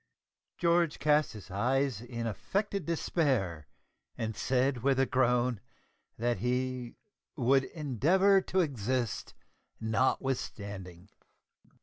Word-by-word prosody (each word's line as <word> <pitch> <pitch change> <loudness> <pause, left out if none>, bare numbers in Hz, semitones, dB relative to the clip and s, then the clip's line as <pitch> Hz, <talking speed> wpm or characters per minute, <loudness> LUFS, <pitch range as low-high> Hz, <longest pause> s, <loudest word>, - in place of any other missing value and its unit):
George 170 -2 +2
cast 150 0 +3
up - - -11
his 95 -4 -10
eyes 125 +3 0
in 120 -1 -5
affected 195 - -2
despair, 130 - 0 0.5
and 110 -1 -3
said 130 +2 +1
with 135 +1 +2
a 135 - +4
groan, 125 -3 +1 0.6
that 120 +1 0
he 125 0 -2 0.4
"would 135 -1 +3
endeavour 175 - +3
to 185 0 +1
exist 125 - -2 0.4
notwithstanding." 105 -6 -2
130 Hz, 100 wpm, -31 LUFS, 110-145 Hz, 0.6 s, a